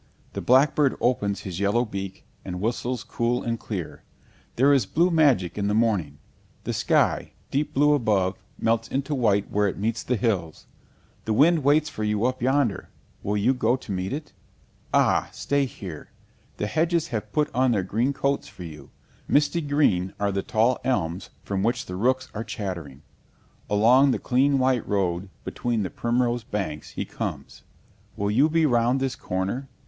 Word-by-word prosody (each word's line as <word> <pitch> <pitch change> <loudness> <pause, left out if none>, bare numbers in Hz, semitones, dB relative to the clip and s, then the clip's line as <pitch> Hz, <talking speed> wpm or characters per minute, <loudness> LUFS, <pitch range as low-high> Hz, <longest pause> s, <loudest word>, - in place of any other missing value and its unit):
The - - -4
blackbird 135 +2 +3
opens 105 -5 0
his 95 -2 -6
yellow 105 +5 +2
beak, 95 -3 -6 0.2
and 90 -1 -5
whistles 120 +4 -2
cool 120 +1 -1
and 115 -1 -2
clear. 95 -7 -6 0.5
There 140 +4 +5
is 130 -8 +2
blue 175 - +2
magic 130 - +3
in 100 - 0
the 105 - +1
morning; 100 -11 +1 0.5
the - - -3
sky, - - +1 0.2
deep 145 +2 -1
blue 150 +2 +5
above, 100 -8 +1 0.2
melts 115 0 +1
into 140 +3 -2
white 105 -7 +1
where 105 0 +2
it 95 - -3
meets 110 +3 -1
the 125 - -1
hills. 95 -8 -2 0.6
The 110 - 0
wind 155 +6 +4
waits 150 +2 +4
for 110 - -5
you 105 +1 0
up 130 0 -1
yonder 130 -4 +1 0.3
will 105 +1 -1
you 115 +6 +3
go 120 -1 +2
to 125 - -8
meet 95 0 -2
it? 150 +3 -6 0.6
Ah, - - +3
stay 140 -1 0
here! 90 - -8 0.5
The - - -1
hedges 165 +7 0
have 110 -3 -4
put 150 +3 0
on 130 +1 +3
their 105 -5 +1
green 115 +8 0
coats 140 0 -1
for 90 - -11
you; 75 -4 -10 0.4
misty 150 +3 +2
green 140 - +1
are 100 0 +1
the 100 0 -1
tall 115 +4 +1
elms 95 -8 -1
from 100 -1 -2
which 120 +4 0
the 90 - -6
rooks 130 +6 +1
are 110 - -4
chattering. 85 -10 -6 0.7
Along 120 +7 +5
the - - +2
clean 135 +3 +2
white 130 -3 +1
road, 95 -2 -1
between 120 -3 -2
the 95 - -4
primrose 120 0 0
banks, 85 -9 -4
he - - -3
comes. - - -6 0.6
Will 100 0 0
you 135 +8 +4
be 165 0 +3
round 120 -1 +2
this 135 -1 -1
corner? 100 +9 -3
115 Hz, 175 wpm, -25 LUFS, 100-135 Hz, 0.7 s, There